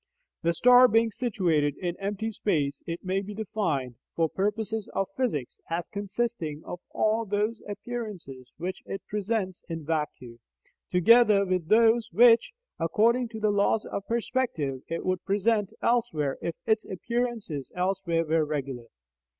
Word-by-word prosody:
The 170 Hz, 0 st, +1 dB
star 250 Hz, +5 st, +7 dB
being 225 Hz, 0 st, +3 dB
situated 175 Hz, -, 0 dB
in 175 Hz, -2 st, -3 dB
empty 205 Hz, +3 st, -2 dB
space, 150 Hz, -10 st, -1 dB
it 170 Hz, 0 st, -4 dB
may 190 Hz, +1 st, 0 dB
be 205 Hz, +1 st, -7 dB
defined, 165 Hz, -, -2 dB, 0.2 s
for 165 Hz, -1 st, +2 dB
purposes 210 Hz, +4 st, -2 dB
of 195 Hz, -, 0 dB
physics, 180 Hz, -, -2 dB
as 170 Hz, +1 st, -2 dB
consisting 200 Hz, -6 st, -3 dB
of 175 Hz, -, -6 dB
all 220 Hz, +1 st, +1 dB
those 210 Hz, +2 st, -1 dB
appearances 205 Hz, -, -7 dB
which 180 Hz, +3 st, -4 dB
it 195 Hz, -, -5 dB
presents 205 Hz, -3 st, -2 dB
in 165 Hz, -2 st, -5 dB
vacuo, 150 Hz, -7 st, -3 dB, 0.5 s
together 210 Hz, +2 st, +6 dB
with 185 Hz, -3 st, -1 dB
those 225 Hz, +2 st, +4 dB
which, 235 Hz, -, +6 dB, 0.3 s
according 230 Hz, +9 st, +2 dB
to 225 Hz, -1 st, -8 dB
the 215 Hz, -1 st, +2 dB
laws 205 Hz, +1 st, +2 dB
of 200 Hz, -, -5 dB
perspective, 230 Hz, -, -1 dB
it 165 Hz, -, -4 dB
would 185 Hz, -1 st, -1 dB
present 205 Hz, +1 st, +1 dB
elsewhere 225 Hz, -, +1 dB
if 170 Hz, -, -3 dB
its 220 Hz, -1 st, +2 dB
appearances 225 Hz, -, -3 dB
elsewhere 180 Hz, -2 st, 0 dB
were 160 Hz, 0 st, +2 dB
regular. 135 Hz, -5 st, -4 dB
195 Hz, 140 wpm, -27 LUFS, 165-225 Hz, 0.5 s, star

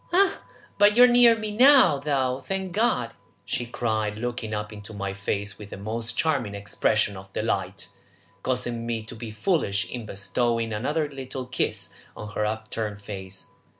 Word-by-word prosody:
"Ah, 385 Hz, +2 st, +3 dB, 0.4 s
but 205 Hz, +2 st, +6 dB
you 245 Hz, -, +9 dB
are -, -, +10 dB
near 240 Hz, -1 st, +6 dB
me 215 Hz, -1 st, -4 dB
now, 250 Hz, -, +7 dB
though, 135 Hz, -2 st, 0 dB
thank 190 Hz, -1 st, -2 dB
God!" 170 Hz, -, +1 dB, 0.3 s
she 120 Hz, +4 st, -2 dB
cried, 110 Hz, -3 st, -1 dB
looking 120 Hz, -1 st, -3 dB
up 105 Hz, 0 st, -3 dB
into 105 Hz, +1 st, -9 dB
my 100 Hz, -1 st, -3 dB
face 100 Hz, +1 st, -3 dB
with 105 Hz, -1 st, -9 dB
the -, -, -7 dB
most 110 Hz, +3 st, -4 dB
charming 135 Hz, -10 st, 0 dB
expression 105 Hz, +1 st, +1 dB
of 95 Hz, 0 st, -11 dB
delight, -, -, -2 dB, 0.5 s
causing 120 Hz, -2 st, -1 dB
me 115 Hz, -2 st, -2 dB
to 110 Hz, -, -10 dB
be 115 Hz, 0 st, -7 dB
foolish 110 Hz, -, 0 dB
in 120 Hz, -3 st, -5 dB
bestowing 115 Hz, +3 st, -1 dB
another 150 Hz, +8 st, 0 dB
little 135 Hz, -2 st, -6 dB
kiss 125 Hz, -, -2 dB, 0.2 s
on 105 Hz, -, -6 dB
her 105 Hz, 0 st, 0 dB
upturned 110 Hz, -1 st, -4 dB
face. 95 Hz, -2 st, -7 dB
115 Hz, 165 wpm, -26 LUFS, 105-145 Hz, 0.5 s, are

